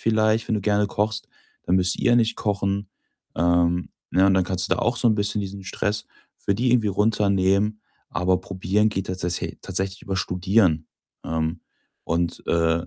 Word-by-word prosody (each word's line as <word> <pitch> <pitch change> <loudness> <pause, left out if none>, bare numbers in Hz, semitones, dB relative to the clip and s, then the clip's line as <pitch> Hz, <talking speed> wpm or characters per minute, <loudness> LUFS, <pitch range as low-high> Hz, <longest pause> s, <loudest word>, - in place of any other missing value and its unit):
vielleicht, 110 0 +2
wenn - - +1
du - - -2
gerne 105 0 +2
kochst, 105 +2 -2 0.4
„dann 90 - +2
müsst 90 -1 +4
ihr 120 - +3
nicht 115 -1 +2
kochen,“ 100 -1 -1 0.5
ähm, 85 +1 +2 0.2
ne? 95 +2 +4
Und 95 - +4
dann 95 -1 +3
kannst 90 0 0
du - - +5
da - - -3
auch 120 +1 +1
so 120 - +3
'n 110 - +3
bisschen 105 0 0
diesen 100 0 -6
Stress 105 +2 -2 0.3
für 100 - -1
die 120 +5 +1
irgendwie 115 -3 +3
runternehmen. 100 0 +1 0.3
Aber 90 0 +1
probieren 95 +3 0
geht 95 -2 -3
tatsäsä 90 -1 -2
tatsächlich 95 0 -3
über 95 - -3
Studieren. 90 -3 +1 0.4
Ähm, 80 +1 -2 0.4
und, 85 +1 -1
äh 85 0 +1
95 Hz, 175 wpm, -23 LUFS, 90-105 Hz, 0.5 s, du